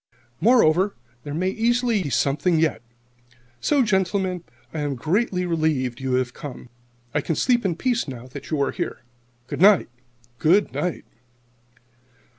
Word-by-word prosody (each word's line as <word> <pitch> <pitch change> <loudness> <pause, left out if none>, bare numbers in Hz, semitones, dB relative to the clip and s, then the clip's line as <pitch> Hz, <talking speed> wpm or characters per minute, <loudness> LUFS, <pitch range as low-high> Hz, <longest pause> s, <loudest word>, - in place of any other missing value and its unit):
Moreover, 200 -5 +4 0.3
there 145 - -6
may 185 +3 0
easily 235 0 +1
be 150 - -3
something 145 +7 +1
yet. 160 -2 +1 0.8
So, 285 - +2
gentlemen, 190 -3 0 0.3
I 160 - -3
am 145 -2 -1
greatly 180 - 0
relieved 155 -8 0
you 130 -1 -2
have 125 -1 0
come. 130 -3 -9 0.4
I - - +1
can 160 - -2
sleep 240 - +2
in 185 -4 0
peace 245 +2 0
now 125 -3 -7
that - - -9
you 155 - -1
are - - 0
here. - - -4 0.4
Good - - -5
night! 195 -7 +6 0.5
Good 185 +6 +3
night!" 180 -2 -3
175 Hz, 145 wpm, -23 LUFS, 145-205 Hz, 0.8 s, night